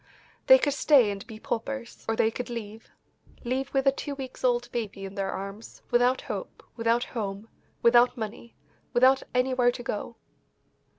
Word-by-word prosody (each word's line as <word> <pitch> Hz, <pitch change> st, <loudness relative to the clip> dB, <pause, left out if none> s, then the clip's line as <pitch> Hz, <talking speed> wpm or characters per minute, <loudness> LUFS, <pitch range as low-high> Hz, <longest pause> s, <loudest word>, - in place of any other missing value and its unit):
They -, -, +10 dB
could 290 Hz, -, 0 dB
stay 270 Hz, -6 st, +5 dB
and 200 Hz, +3 st, -7 dB
be 220 Hz, -3 st, -10 dB
paupers, 240 Hz, +2 st, -5 dB
or 225 Hz, -, +1 dB
they 220 Hz, 0 st, +2 dB
could 245 Hz, +1 st, -5 dB
leave 225 Hz, -2 st, -7 dB, 0.5 s
leave 260 Hz, +2 st, -2 dB
with 270 Hz, 0 st, +1 dB
a 275 Hz, -, +6 dB
two 280 Hz, +1 st, -5 dB
weeks 265 Hz, -2 st, -8 dB
old 245 Hz, -1 st, +2 dB
baby 205 Hz, -4 st, -4 dB
in 195 Hz, -, -8 dB
their 195 Hz, -1 st, -2 dB
arms, 195 Hz, +3 st, -7 dB
without 245 Hz, +2 st, +3 dB
hope, -, -, -6 dB
without 230 Hz, +1 st, +1 dB
home, 210 Hz, -2 st, -5 dB, 0.3 s
without 240 Hz, +2 st, +5 dB
money, 225 Hz, +1 st, -7 dB, 0.4 s
without 260 Hz, +2 st, +5 dB
anywhere 250 Hz, -1 st, +3 dB
to 245 Hz, -, -8 dB
go. 230 Hz, +1 st, -4 dB
240 Hz, 165 wpm, -27 LUFS, 220-255 Hz, 0.5 s, They